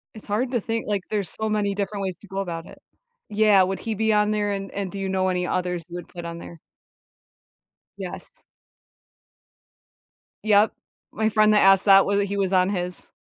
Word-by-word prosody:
It's 220 - -12
hard 235 +5 -1
to 240 -4 0
think, 225 +2 -3
like, 205 -3 -1
there's 205 -5 -2
so 220 0 -4
many 205 -2 0
different 200 0 -3
ways 185 -2 -3
to 205 - -16
go 195 +1 -5
about 170 -3 -4
it. - - -14 0.5
Yeah, 210 -2 +4
would 190 +1 -2
he 225 - -3
be 220 +1 +1
on 210 0 +3
there, 210 -1 0
and 195 -1 -4
and 195 -2 -4
do 200 - -7
you 195 - -2
know 190 0 +1
any 180 -1 -1
others 180 -1 -2
you 175 - -9
would 175 - -7
put 175 -1 -8
on 170 0 -6
there? 170 -1 -11 1.4
Yes. - - -9 2.0
Yep. 210 0 +4 0.4
My 220 0 0
friend 215 0 +4
that 210 - +5
asked 195 0 +5
that, 195 -1 +7
whether 200 0 +1
he 200 0 -3
was 195 -1 0
on 185 0 +3
his 180 -3 -4
200 Hz, 200 wpm, -24 LUFS, 185-210 Hz, 2.0 s, that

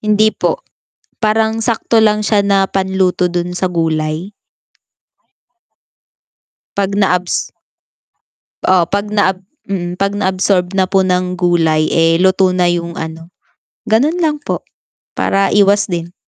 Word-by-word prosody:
Hindi 215 0 +2
po. - - -2 0.5
Parang 220 0 +1
sakto 230 0 0
lang 210 -1 +2
siya 205 -1 +2
na 195 -1 +3
panluto 190 -1 0
dun 175 0 -3
sa 185 - 0
gulay. 165 +2 -2 2.4
Pag 200 0 -1
na-abs 180 -3 0 1.2
Oo, 185 -2 +4
'pag 200 +4 -2
naab 195 -3 +1 0.3
mm, 175 -1 -3
'pag 200 +1 0
na-absorb 190 -1 0
na 190 - +3
po 190 +1 +1
ng 180 -1 0
gulay, 165 -3 +2
eh, 165 0 +3
luto 190 0 +3
na 180 -1 +2
yung 170 -1 -2
ano, 165 +2 -8 0.5
ganun 275 +10 +2
lang 300 -1 0
po - - -4 0.5
para 195 0 +1
iwas 205 -1 +3
din. 170 0 -4
190 Hz, 125 wpm, -15 LUFS, 175-205 Hz, 2.4 s, Oo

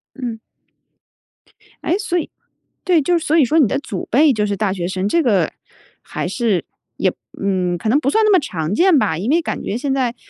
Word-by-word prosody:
嗯。 240 -4 -5 1.4
诶？ 360 - +1
所 385 -4 -2
以 325 - -2 0.5
对， 350 -4 +3
就 350 +4 +2
所 320 0 +1
以 290 - +5
说 320 +6 +2
你 265 - +5
的 - - -1
祖 200 -9 -6
辈 285 +3 +5
就 210 -1 0
是 200 -1 -2
大 205 -3 0
学 175 -2 -3
生， 190 +1 -2
这 335 +10 +2
个 195 -9 +2 0.5
还 - - -5
是 210 -2 0 0.3
也 - - +1 0.3
嗯， 185 -3 0
可 215 - -5
能 280 +6 +4
不 275 - 0
算 440 +7 +3
那 425 - +4
么 375 - +6
常 170 - -3
见 350 - +4
吧， 160 - 0
因 205 +8 -3
为 335 - +3
感 - - -4
觉 220 - -2
现 270 +1 -1
在， 250 -3 0
245 Hz, 225 characters per minute, -19 LUFS, 195-315 Hz, 1.4 s, 么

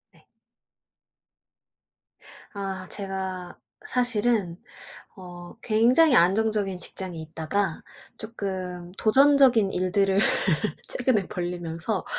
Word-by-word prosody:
네. - - -25 2.3
아. 195 -2 -5
제가 190 -2 -5 0.3
사실은 230 - 0 0.6
어 175 -2 -11
굉장히 245 +7 +4
안정적인 195 +1 +2
직장에 180 0 -6
있다가 160 +3 -3 0.4
쪼끔 185 -5 -6
도전적인 260 -3 +4
일들을 190 +2 +1 0.7
최근에 240 -7 0
벌리면서 175 +2 -4
195 Hz, 180 characters per minute, -25 LUFS, 180-220 Hz, 2.3 s, 굉장히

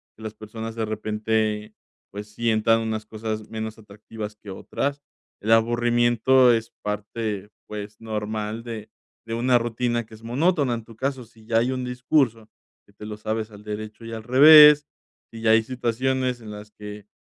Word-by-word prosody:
que 110 - -14
las 110 - -5
personas, 110 +1 -7
de 115 -1 -1
repente, 110 0 -1 0.4
pues, 105 +1 -7
sientan 115 0 +2
unas 110 -1 -3
cosas 110 0 -5
menos 110 0 -5
atractivas 105 0 -9
que 105 -1 -13
otras. 140 +8 -3 0.4
El 110 - -1
aburrimiento 120 +2 +4
es 115 0 -2
parte, 105 0 -4 0.2
pues, 105 0 -7
normal 110 0 -4
de 115 -3 -7 0.4
de 115 - -5
una 120 +2 +3
rutina 120 0 -1
que 110 - -14
es 110 - -17
monótona, 140 +3 +1
en 115 - -4
tu 115 0 -16
caso, 130 -1 -2
si 110 -1 -20
ya 115 0 +2
hay 125 +2 +1
un 130 -1 -3
discurso 125 -3 0 0.4
que 100 - -24
te 105 +1 -11
lo 105 - -6
sabes 110 +1 -3
al 105 0 -13
derecho 110 +1 -7
y 115 - -8
al 110 - -5
revés. 150 +3 +9 0.5
si 115 - -9
ya 110 - +3
hay 110 0 +5
situaciones 125 +1 -1
en 110 - -9
las 105 0 -10
que, 105 -1 -10
110 Hz, 175 wpm, -24 LUFS, 105-120 Hz, 0.5 s, revés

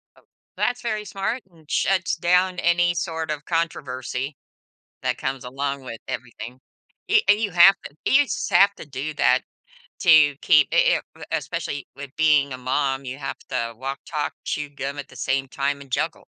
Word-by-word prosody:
Oh, - - -22 0.3
that's 245 0 0
very 215 -3 -2
smart 200 +5 -3
and 160 -3 -22
shuts 185 -4 +1
down 180 +2 +2
any 175 0 +3
sort 160 -1 -3
of 150 0 -5
controversy 135 -5 -2 0.7
that - - -1
comes 130 -1 -3
along 135 +1 -3
with 115 -3 -7
everything, 120 +1 -7 0.5
a 435 +1 +6
and 205 - +6
you 210 - 0
have 180 +2 +8
to 145 - -10
you 290 +2 +5
just 240 - -3
have 200 +1 +5
to - - -10
do 140 +3 -4
that - - +3 0.6
to 155 -5 +6
keep 150 -2 +5
i - - +1
it, - - +4
uh, - - -13
especially 145 -1 -3
with 140 -1 -9
being 150 -3 +4
a 130 - -6
mom, 135 +1 -1
you 130 +2 -6
have 135 - -5
to 115 -3 -2
walk, 135 +3 -4
talk, 150 -2 -3
chew 150 -1 -2
gum 140 0 -5
at 140 - -6
the - - -15
same 135 0 -1
time 140 +1 -2
and 140 - -13
juggle. - - -2
145 Hz, 185 wpm, -23 LUFS, 135-175 Hz, 0.7 s, have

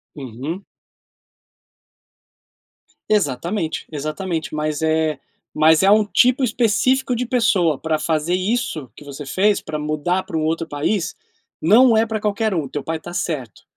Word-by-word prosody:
Uhum. 140 - -6 2.5
Exatamente, 170 -1 -1
exatamente. 155 +3 -4
Mas 155 0 -2
é 160 -1 +1 0.3
mas 155 +2 +4
é 195 - +4
um 210 0 +5
tipo 250 +5 +3
específico 250 +3 +2
de 250 +2 -2
pessoa 200 - +2
pra 160 -1 0
fazer 160 +2 0
isso 185 - -2
que - - -13
você 145 0 -8
fez, 200 +8 +2
pra 155 -1 -5
mudar 155 +5 -1
pra 165 - -5
um 155 - 0
outro 165 +1 -1
país, 160 +5 -1 0.4
não 225 +6 +5
é 225 - +4
pra 220 -2 -3
qualquer 215 0 0
um, 155 -6 -1
teu 145 +1 -5
pai 165 0 -2
está 175 +2 -10
certo. 135 - -4
165 Hz, 145 wpm, -20 LUFS, 155-210 Hz, 2.5 s, um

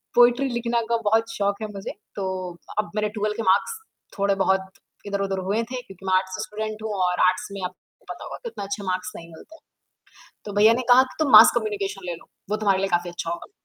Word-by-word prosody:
Poetry 245 +3 +5
लिखना 235 -1 0
का 235 - +3
बहुत 225 +1 +2
शौक़ 200 +1 -1
है 215 - -2
मुझे, 195 -1 -6 0.2
तो 190 -2 -3 0.3
अब 210 -1 -2
मेरे 210 0 0
12 210 0 -2
के 225 - -2
मार्क्स 205 - +2 0.4
थोड़े-बहुत 190 -1 +1 0.4
इधर-उधर 195 -1 -1
हुए 215 +3 +2
थे 250 -1 -3
क्योंकि 195 -4 -14
मैं 190 - +1
आर्ट्स 185 0 -1
स्टूडेंट 215 0 -5
हूँ 220 - -3
और 180 0 0
आर्ट्स 185 0 0
में 200 - -6
आपको 185 - -12
पता - - -12
होगा - - -7
कि 470 - -4
उतना 205 - -7
अच्छे 200 +1 -4
मार्क्स 185 +3 -2
नहीं 170 0 -10
मिलते। 315 - -14 0.9
तो 205 - -6
भैया 210 +2 +6
ने 255 - -1
कहा 255 +2 +8
कि, 260 - -7
तुम 305 -4 +1
मास - - +10
कम्युनिकेशन 200 -4 -2
ले 175 - -2
लो, 165 - -15 0.2
वो 210 - +1
तुम्हारे 200 -3 +2
लिए 195 - 0
काफ़ी 175 0 -5
अच्छा 175 -1 -5
होगा। 170 - -6
200 Hz, 220 wpm, -24 LUFS, 190-225 Hz, 0.9 s, मास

